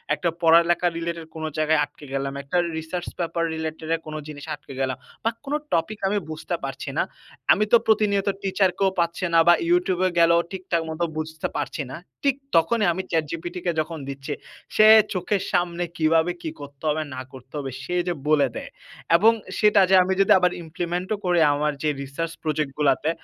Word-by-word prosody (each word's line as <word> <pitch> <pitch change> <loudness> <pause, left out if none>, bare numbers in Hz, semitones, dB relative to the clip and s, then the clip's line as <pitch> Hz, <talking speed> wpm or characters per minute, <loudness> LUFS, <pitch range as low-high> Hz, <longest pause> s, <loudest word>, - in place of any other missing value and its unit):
একটা 175 - -1
পড়ালেখা 170 +1 +5
related 170 -1 -4
কোন 160 - -6
জায়গায় 155 0 +3
আটকে 145 - -9
গেলাম, 135 0 -2
একটা 140 +6 -2 0.2
research 160 +2 -4
paper 170 -1 -1
related 160 0 -5 0.2
কোন 155 0 -7
জিনিসে 150 0 -9
আটকে 145 -1 -13
গেলাম 130 -1 -1 0.3
বা 225 - +3 0.2
কোন 280 - -3 0.2
topic 170 +6 0
আমি 205 +2 +1
বুঝতে 160 +3 -4
পারছি 135 0 -5
না। - - +3 0.5
আমি 210 - +4
তো 235 - +9
প্রতিনিয়ত 205 -2 +2 0.2
teacher 195 0 +2
কেও 195 - +4
পাচ্ছি 170 +2 -1
না 165 - +6
বা 175 - +9 0.2
YouTube-এ 185 - +2
গেলেও 170 0 +5
ঠিকঠাক 180 -3 -2
মতো 160 +2 -2
বুঝতে 160 0 -3
পারছি 145 +1 -3
না। - - -5 0.3
ঠিক 275 -2 +3 0.2
তখনই 210 +7 +3
আমি 190 - -3
ChatGPT 165 +1 -2
কে 175 - +2
যখন 160 +1 -6
দিচ্ছি 140 +2 -5 0.4
সে 215 - +7 0.3
চোখের 190 +1 -1
সামনে 175 0 0
কিভাবে 160 +2 +3
কি 160 - -3
করতে 140 0 -11
হবে, 155 +1 0
না 130 - -5
করতে 130 0 -14
হবে 135 -2 -4
সে 180 - -3
যে 175 - +1
বলে 150 -2 +4
দেয় - - -6 0.5
এবং 220 +6 +6 0.3
সেটা 210 -2 +5
যে 190 - +7
আমি 190 +1 0
যদি 195 - +3
আবার 180 0 +3
implement-ও 175 +4 -3
করি 175 -1 +3
আমার 150 +1 0
যে 155 - +2
research 160 +5 -4
project 155 -2 -1
গুলাতে 145 +1 +2
165 Hz, 185 wpm, -24 LUFS, 155-180 Hz, 0.5 s, তো